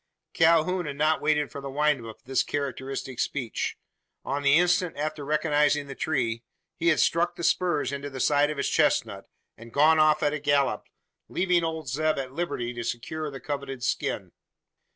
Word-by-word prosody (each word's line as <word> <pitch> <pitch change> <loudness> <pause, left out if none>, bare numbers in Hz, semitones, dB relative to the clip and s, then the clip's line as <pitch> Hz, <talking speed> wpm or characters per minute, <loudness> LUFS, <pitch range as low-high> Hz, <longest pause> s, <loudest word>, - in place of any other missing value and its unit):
Calhoun 165 +2 +3
had 145 - -4
not 155 +2 +2
waited 150 -2 +1
for 140 - -7
the 140 - -6
wind 145 -2 +1
up 115 -1 -8
of - - -36
this 130 0 +1
characteristic 135 -2 -4
speech. 125 -6 -2 0.5
On 140 +2 -2
the 140 0 +4
instant 180 -1 +2
after 155 0 -3
recognising 150 -1 +2
the 140 - -7
tree, 120 -6 -1 0.3
he 170 - -2
had 160 - +4
struck 170 +1 +2
the 170 - -7
spurs 160 -6 +1
into 140 0 -5
the 135 -1 -8
sides 145 +2 +3
of 150 - -6
his 140 - 0
chestnut, - - +1 0.3
and 115 +1 -12
gone 155 +4 +5
off 155 0 +4
at 145 - +2
a 150 - -2
gallop, 145 -1 +1 0.4
leaving 180 -2 +1
old 160 -2 -3
Zeb 155 +5 0
at 130 -1 -4
liberty 125 -7 -3
to 120 0 -5
secure 150 +7 -4
the 135 -1 -8
coveted 140 -3 -5
skin. 125 - -2
145 Hz, 185 wpm, -26 LUFS, 135-155 Hz, 0.5 s, gone